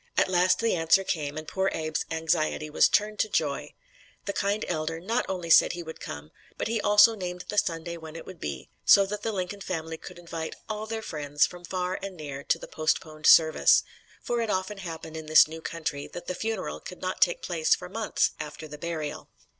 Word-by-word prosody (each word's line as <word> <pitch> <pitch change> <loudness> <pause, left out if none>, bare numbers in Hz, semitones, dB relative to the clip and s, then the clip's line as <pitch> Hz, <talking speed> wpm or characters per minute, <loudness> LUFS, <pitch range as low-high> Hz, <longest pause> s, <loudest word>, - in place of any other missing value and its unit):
At - - +3
last 180 0 +4
the 230 0 +1
answer 165 +3 +4
came 150 -5 -2
and 155 0 -6
poor 190 0 0
Abe's 155 -1 -2
anxiety 160 -1 0
was - - +5
turned 210 0 +1
to 215 - +1
joy. 145 -7 -1 0.5
The 200 - -2
kind 200 +2 0
elder 160 -1 -2
not 220 +8 -1
only 180 -3 -3
said - - +7
he 175 0 -5
would 160 0 -9
come, 75 +1 -8 0.3
but - - -2
he 225 -1 0
also 210 +2 +6
named 180 -3 -5
the 210 - -3
Sunday 170 0 -3
when 160 -1 -10
it 165 - -8
would 185 -2 -10
be, 70 -3 -6
so 200 - +7
that 205 +1 -4
the 225 - -1
Lincoln 195 0 -4
family 160 -3 -4
could - - -11
invite 165 -2 -6
all 215 0 -4
their 220 0 -4
friends 145 -3 +1
from 175 -1 -9
far 180 +1 -2
and 195 -2 -6
near 140 -2 -6
to - - +2
the - - -9
postponed 155 0 -1
service 160 -1 +6 0.4
for 240 -1 0
it 225 - -2
often 190 +1 -2
happened 160 -3 -7
in 160 -1 -7
this 155 0 +7
new 160 +1 -8
country 155 -4 -4
that 175 - -9
the - - -3
funeral 220 +1 -3
could 180 - -10
not 185 0 -3
take 175 - +3
place 165 -3 +2
for - - -9
months 215 +4 0
after 155 +1 -7
the 150 0 -10
burial. 155 -2 -4
170 Hz, 215 wpm, -27 LUFS, 155-195 Hz, 0.5 s, said